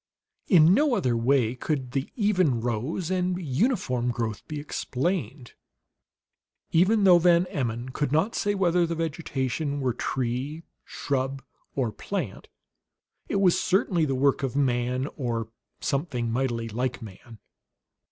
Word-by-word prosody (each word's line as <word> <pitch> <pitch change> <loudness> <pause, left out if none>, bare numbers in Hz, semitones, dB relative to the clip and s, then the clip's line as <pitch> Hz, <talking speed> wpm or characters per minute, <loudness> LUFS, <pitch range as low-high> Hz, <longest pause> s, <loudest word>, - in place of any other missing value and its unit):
In 170 -1 +6
no 280 +2 +3
other 125 - +1
way 120 0 +2
could 130 -1 -3
the 135 +1 -2
even 185 - +2
rows 125 - -2
and 180 -1 0
uniform 140 - 0
growth 115 -3 -2
be 150 -1 -5
explained; 145 - -3 1.2
even 200 +6 +4
though 180 -3 +7
Van 170 0 +4
Emmon 120 - -2
could 140 +1 -2
not 175 +10 +2
say 205 -1 0
whether 175 -2 +2
the 165 - -2
vegetation 145 -3 -2
were 130 -3 0
tree, 130 +6 -3 0.2
shrub, 135 -1 -2 0.3
or 125 -5 0
plant, 150 - -5 0.8
it - - -1
was 185 -3 +4
certainly 185 -3 +2
the 135 -2 -1
work 135 +1 +2
of 135 -1 -2
man 125 -1 0
or 115 -5 -2 0.3
some 140 +5 0
thing 120 -5 -2
mightily 120 -2 -1
like 120 +2 -3
man. 110 +3 -12
140 Hz, 135 wpm, -26 LUFS, 125-175 Hz, 1.2 s, though